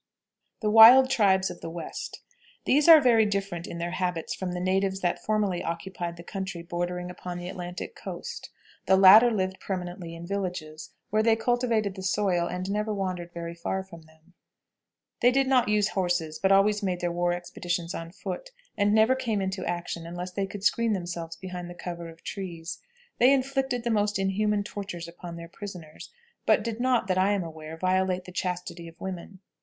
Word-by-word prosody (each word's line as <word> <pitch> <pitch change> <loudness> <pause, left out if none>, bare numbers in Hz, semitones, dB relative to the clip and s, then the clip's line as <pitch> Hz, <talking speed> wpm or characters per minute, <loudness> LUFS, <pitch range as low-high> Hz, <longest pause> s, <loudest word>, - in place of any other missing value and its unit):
THE 210 -1 +1
WILD 245 +4 +9
TRIBES 190 -7 +3
OF 175 - -11
THE - - -5
WEST. 165 -1 -7 0.4
These 290 +3 +3
are 320 -1 +11
very 240 -5 +5
different 195 -4 -2
in 170 - -6
their 170 0 -3
habits 180 -3 -2
from 185 -2 -4
the 180 - -3
natives 190 +1 0
that 175 - -1
formerly 210 -4 0
occupied 170 0 -4
the 170 - -10
country 190 -2 -5
bordering 180 +1 -3
upon 180 0 -7
the 175 0 -6
Atlantic 180 - -6
coast. - - -7 0.4
The 190 - +5
latter 200 +5 +9
lived 190 -4 -2
permanently 180 -2 -5
in 165 +1 -8
villages, 175 -5 -4 0.2
where 215 +1 +3
they 225 0 +4
cultivated 230 -3 0
the 190 - -8
soil, 185 -2 +1
and 180 +1 -4
never 210 +1 -1
wandered 185 -4 -3
very 170 0 -6
far 190 +3 -3
from 170 -3 -13
them. 160 +2 -24 0.9
They 245 - +5
did 270 +2 +2
not 255 -4 +3
use 210 0 +2
horses, 175 -5 -1
but 190 - +2
always 205 +2 +4
made 185 -3 -1
their 175 -1 -1
war 175 0 0
expeditions 175 0 -3
on 165 0 -6
foot, - - -6 0.3
and 205 +1 +2
never 220 +4 +5
came 235 -5 -1
into 190 -1 -2
action 175 -1 -4
unless 175 +1 -6
they 195 +1 -2
could 200 0 -8
screen 230 +1 +2
themselves 175 -3 -4
behind 180 0 -7
the 175 - -9
cover 170 -1 -6
of 165 0 -15
trees. 175 -4 -6 0.4
They 250 +3 +6
inflicted 270 -2 0
the 235 - 0
most 210 -1 +1
inhuman 205 +2 +1
tortures 195 -5 -6
upon 170 0 -9
their 170 0 -8
prisoners, 175 -4 -9 0.4
but 215 - +4
did 230 0 -4
not, 250 -4 +2
that 185 -1 0
I 195 +2 +3
am 200 -3 0
aware, 160 -1 -8
violate 185 +1 0
the 180 - -9
chastity 180 -1 -4
of 165 - -14
women. 190 0 -7
185 Hz, 190 wpm, -27 LUFS, 175-210 Hz, 0.9 s, are